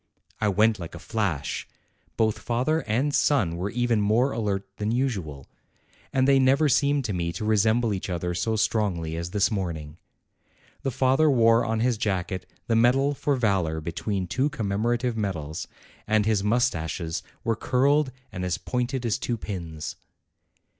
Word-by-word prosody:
I 110 Hz, -, +1 dB
went 105 Hz, +2 st, +3 dB
like 85 Hz, -1 st, -7 dB
a -, -, -6 dB
flash. 95 Hz, -10 st, -2 dB, 0.5 s
Both 110 Hz, -1 st, +1 dB
father 125 Hz, +7 st, 0 dB
and 130 Hz, +7 st, +1 dB
son 105 Hz, -, +2 dB
were 90 Hz, +4 st, -2 dB
even 120 Hz, -1 st, +1 dB
more 115 Hz, +6 st, +3 dB
alert 100 Hz, -3 st, -2 dB
than 105 Hz, +1 st, -1 dB
usual, 95 Hz, -, -2 dB, 0.6 s
and 130 Hz, 0 st, +2 dB
they 135 Hz, -1 st, +5 dB
never 135 Hz, +4 st, +4 dB
seemed 140 Hz, 0 st, +2 dB
to> 105 Hz, -, -2 dB
me 85 Hz, -2 st, -1 dB
to 100 Hz, +5 st, -4 dB
resemble 110 Hz, +1 st, +2 dB
each 95 Hz, 0 st, -4 dB
other 90 Hz, 0 st, -2 dB
so 110 Hz, +6 st, 0 dB
strongly 95 Hz, -7 st, 0 dB
as 85 Hz, +1 st, -4 dB
this 105 Hz, +4 st, +1 dB
morning. 85 Hz, -6 st, -4 dB, 0.8 s
The 135 Hz, -, -1 dB
father 135 Hz, +5 st, +3 dB
wore 115 Hz, -3 st, +5 dB
on 110 Hz, -1 st, -1 dB
his 120 Hz, -2 st, +1 dB
jacket 95 Hz, -3 st, -2 dB, 0.2 s
the 115 Hz, -, +1 dB
medal 130 Hz, +5 st, +4 dB
for 145 Hz, 0 st, 0 dB
valor 95 Hz, -10 st, +1 dB
between 90 Hz, +4 st, -3 dB
two 130 Hz, +10 st, 0 dB
commemorative 120 Hz, 0 st, -1 dB
medals, 85 Hz, -8 st, -3 dB, 0.4 s
and 110 Hz, -1 st, +2 dB
his 105 Hz, -3 st, +2 dB
moustaches 90 Hz, -, 0 dB, 0.2 s
were 115 Hz, -3 st, +1 dB
curled 135 Hz, +4 st, +2 dB, 0.2 s
and 90 Hz, -, -5 dB
as 90 Hz, -1 st, -1 dB
pointed 125 Hz, 0 st, -2 dB
as 115 Hz, +1 st, 0 dB
two 120 Hz, -2 st, -2 dB
pins. 85 Hz, -8 st, -6 dB
110 Hz, 160 wpm, -26 LUFS, 90-125 Hz, 0.8 s, they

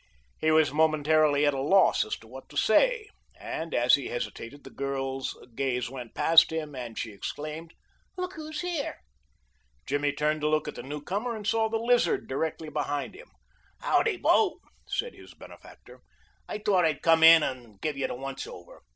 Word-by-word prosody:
He 155 Hz, -, +1 dB
was 155 Hz, -2 st, +4 dB
momentarily 155 Hz, -1 st, +3 dB
at 145 Hz, -, +3 dB
a 135 Hz, -, -2 dB
loss 190 Hz, +7 st, +4 dB
as 110 Hz, -, -4 dB
to 110 Hz, -, -17 dB
what 130 Hz, +3 st, -12 dB
to -, -, -9 dB
say, 440 Hz, -, +3 dB, 0.3 s
and 165 Hz, 0 st, -5 dB
as 120 Hz, 0 st, +3 dB
he 140 Hz, -, +3 dB
hesitated 120 Hz, +3 st, -6 dB
the -, -, -12 dB
girl's 135 Hz, -1 st, -3 dB, 0.2 s
gaze 125 Hz, -1 st, -2 dB
went 125 Hz, -3 st, -9 dB
past 165 Hz, 0 st, +6 dB
him 155 Hz, -2 st, -4 dB
and 120 Hz, -4 st, -7 dB
she 110 Hz, -, -4 dB
exclaimed: 155 Hz, +10 st, -7 dB, 0.4 s
"Look 365 Hz, 0 st, -4 dB
who's 310 Hz, 0 st, -6 dB
here!" 350 Hz, -5 st, -3 dB, 0.9 s
Jimmy 145 Hz, +1 st, 0 dB
turned 150 Hz, +1 st, -1 dB
to 150 Hz, -, +1 dB
look 155 Hz, 0 st, +1 dB
at -, -, -4 dB
the -, -, -8 dB
newcomer, 190 Hz, -, -4 dB
and 210 Hz, -2 st, -8 dB
saw 220 Hz, +1 st, +1 dB
the 225 Hz, -, 0 dB
Lizard 240 Hz, +2 st, +1 dB
directly 155 Hz, +3 st, -3 dB
behind 145 Hz, -1 st, -3 dB
him. -, -, -14 dB, 0.5 s
"Howdy, 440 Hz, -5 st, +2 dB
bo," 370 Hz, -3 st, +2 dB, 0.3 s
said 485 Hz, -, -2 dB
his -, -, -15 dB
benefactor. -, -, -15 dB, 0.5 s
"I -, -, -3 dB
thought 205 Hz, -4 st, +2 dB
I'd 155 Hz, -3 st, 0 dB
come 165 Hz, -1 st, +4 dB
in 160 Hz, -1 st, +9 dB
and 120 Hz, -6 st, -5 dB
give 155 Hz, +4 st, -2 dB
you 135 Hz, -, -1 dB
the -, -, -5 dB
once 135 Hz, +1 st, -6 dB
over. 85 Hz, -, -12 dB
155 Hz, 180 wpm, -27 LUFS, 135-200 Hz, 0.9 s, in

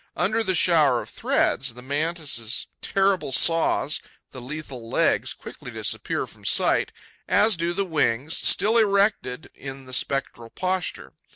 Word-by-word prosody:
Under 215 Hz, +6 st, +1 dB
this 190 Hz, -4 st, +1 dB
shower 150 Hz, -9 st, +4 dB
of -, -, -11 dB
threads, 130 Hz, -3 st, 0 dB
the 125 Hz, -, -10 dB
Mantis' 145 Hz, -5 st, -1 dB, 0.2 s
terrible 195 Hz, -6 st, +1 dB
saws, 160 Hz, +1 st, +3 dB, 0.3 s
the 130 Hz, -, -9 dB
lethal 130 Hz, -3 st, -8 dB
legs, -, -, +1 dB
quickly -, -, -10 dB
disappear -, -, -2 dB
from -, -, -17 dB
sight, -, -, +2 dB, 0.4 s
as 205 Hz, +3 st, +3 dB
do 170 Hz, +1 st, -1 dB
the 195 Hz, +3 st, -1 dB
wings, 150 Hz, -3 st, 0 dB
still 225 Hz, +3 st, +3 dB
erected 200 Hz, -, +1 dB
in 135 Hz, -1 st, -9 dB
the 130 Hz, -, -11 dB
spectral 130 Hz, -3 st, -2 dB
posture. 185 Hz, +5 st, -3 dB
155 Hz, 135 wpm, -24 LUFS, 130-185 Hz, 0.4 s, shower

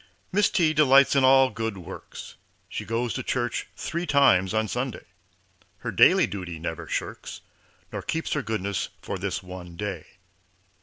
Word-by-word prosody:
Miss 205 Hz, +2 st, +3 dB
T. 160 Hz, -4 st, +2 dB
delights 140 Hz, -2 st, +5 dB
in 135 Hz, -, +4 dB
all 135 Hz, 0 st, +6 dB
good 115 Hz, -3 st, -3 dB
works, 90 Hz, -, -9 dB, 0.3 s
She -, -, -6 dB
goes 115 Hz, 0 st, -1 dB
to -, -, -3 dB
church 120 Hz, -2 st, -2 dB
three 170 Hz, +1 st, -3 dB
times 115 Hz, -11 st, +4 dB
on 110 Hz, 0 st, 0 dB
Sunday, 125 Hz, +2 st, -4 dB, 0.7 s
Her -, -, -5 dB
daily -, -, +6 dB
duty 90 Hz, -4 st, -6 dB
never 80 Hz, 0 st, -5 dB
shirks, -, -, -5 dB, 0.5 s
Nor -, -, -3 dB
keeps 160 Hz, 0 st, -2 dB
her -, -, 0 dB
goodness 100 Hz, -4 st, -2 dB
for 100 Hz, -, -4 dB
this 95 Hz, +1 st, -3 dB
one 90 Hz, -2 st, -9 dB
day. 95 Hz, -3 st, -5 dB
110 Hz, 155 wpm, -26 LUFS, 95-135 Hz, 0.7 s, all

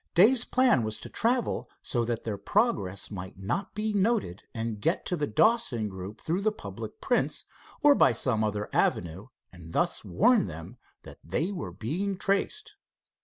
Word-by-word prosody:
Dave's 225 Hz, +7 st, +6 dB
plan 255 Hz, -, +3 dB
was 110 Hz, -1 st, -1 dB
to -, -, -9 dB
travel 240 Hz, +1 st, 0 dB
so 120 Hz, -2 st, 0 dB
that 120 Hz, -1 st, -2 dB
their 110 Hz, -3 st, -2 dB
progress 100 Hz, -, 0 dB
might 95 Hz, -2 st, -7 dB
not 100 Hz, -, -3 dB
be 215 Hz, 0 st, -1 dB
noted 200 Hz, -, +1 dB
and 115 Hz, -2 st, -4 dB
get 165 Hz, -, 0 dB
to 180 Hz, -, 0 dB
the 150 Hz, -3 st, -1 dB
Dawson 125 Hz, -, +2 dB
group 95 Hz, +3 st, -8 dB
through 175 Hz, +4 st, -1 dB
the 215 Hz, +1 st, +2 dB
public 430 Hz, -, -8 dB
prints -, -, 0 dB, 0.4 s
or 295 Hz, -1 st, +8 dB
by 135 Hz, -, +5 dB
some 115 Hz, -1 st, +1 dB
other 105 Hz, -1 st, -1 dB
avenue, 85 Hz, +5 st, 0 dB, 0.3 s
and 85 Hz, -2 st, -12 dB
thus -, -, +1 dB
warn 220 Hz, -, +3 dB
them 80 Hz, -1 st, -9 dB, 0.3 s
that -, -, -12 dB
they 155 Hz, -, -1 dB
were 105 Hz, -, -5 dB
being 175 Hz, -, -3 dB
traced. 195 Hz, -, -1 dB
120 Hz, 170 wpm, -28 LUFS, -, 0.4 s, or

